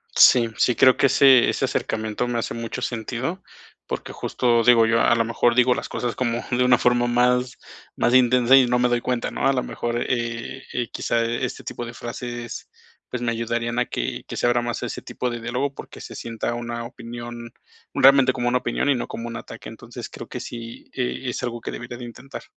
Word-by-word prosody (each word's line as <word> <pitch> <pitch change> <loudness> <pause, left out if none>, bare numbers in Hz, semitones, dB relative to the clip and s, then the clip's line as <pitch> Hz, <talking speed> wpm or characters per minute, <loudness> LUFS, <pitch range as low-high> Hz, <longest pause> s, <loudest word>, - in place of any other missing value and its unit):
Sí. 120 -2 +7
Sí 125 - +3
creo 130 -1 +6
que - - +3
ese 130 -2 +6
ese - - 0
acercamiento, 110 +2 -2
me 120 -1 -1
hace - - -3
mucho 115 +2 -5
sentido. 120 - -3 0.4
Porque - - -5
justo, 120 -2 +1
digo 115 -1 +6
yo, 115 +1 +3
a 120 - +4
lo 115 -1 +1
mejor, 115 +1 +2
digo 125 0 +5
las - - -5
cosas, 120 -3 -3
como 120 -1 -1
de 125 +1 +2
una 125 -1 +5
forma 120 0 +2
más 125 +1 +2 0.4
más 120 - +1
intensa 125 0 +5
y 130 -2 +6
no 125 0 +2
me 125 0 +3
doy 120 -1 +1
cuenta, 125 -1 -2
¿no? - - 0
A 135 - +4
la 130 - 0
mejor, 120 0 -3
eh 120 +1 -3
eh, 120 -1 -2
quizá, 115 0 0
este 120 +2 -3
tipo 120 - -5
de 120 - -8
frases, 120 0 -6 0.4
pues 125 - -4
me 120 - +1
ayudarían 115 +1 -2
a 125 - +2
que - - -4
que - - -6
se - - 0
abra 120 0 +3
más 120 -1 -3
ese - - -4
tipo 125 - -4
de 120 -1 -5
diálogo, 125 +4 -2
porque - - -10
se - - -9
sienta 115 0 -4
una 120 0 -4
opinión 120 0 -8 0.4
realmente 135 -1 +6
como 120 -2 -2
una 125 +1 +2
opinión 120 +4 -1
y 140 - +4
no 120 - -3
como 115 +1 -6
un 120 0 -5
ataque. 110 - -9
Entonces, - - -9
creo - - -9
que - - -6
sí, 115 -1 -8
eh, 125 -1 -2
es - - -4
algo 120 -1 -3
que - - -5
debería 120 0 -7
de 120 - -8
intentar. 130 +3 -9
120 Hz, 220 wpm, -23 LUFS, 115-125 Hz, 0.4 s, Sí